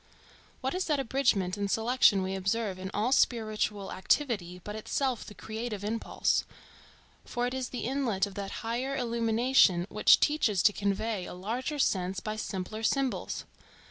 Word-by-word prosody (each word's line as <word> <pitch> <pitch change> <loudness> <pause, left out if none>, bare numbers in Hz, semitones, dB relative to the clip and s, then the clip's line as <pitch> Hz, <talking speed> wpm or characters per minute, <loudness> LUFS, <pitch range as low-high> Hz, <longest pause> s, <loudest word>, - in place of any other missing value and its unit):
What 265 - -1
is 370 +1 -1
that 300 -3 +1
abridgment 225 -8 +1
and 200 -1 -1
selection 225 -3 +3
we 190 0 -2
observe 195 0 -1
in 190 0 -5
all 215 +5 0
spiritual 215 -5 +1
activity, 190 -4 0
but 210 - -6
itself 250 +3 -1
the 210 - -11
creative 220 -2 -5
impulse? 220 +2 0 0.8
for 245 0 -2
it 250 - -2
is 260 -2 -3
the 250 - -5
inlet 240 -7 0
of 200 - -9
that 200 +2 -6
higher 250 +4 -1
illumination 230 -6 +3
which 210 - +6
teaches 230 - +2
to 210 - +5
convey 200 0 -1
a - - -7
larger 240 - -3
sense 185 -8 +1
by 215 0 -4
simpler 215 0 -4
symbols. 270 +3 -1
220 Hz, 155 wpm, -29 LUFS, 195-250 Hz, 0.8 s, which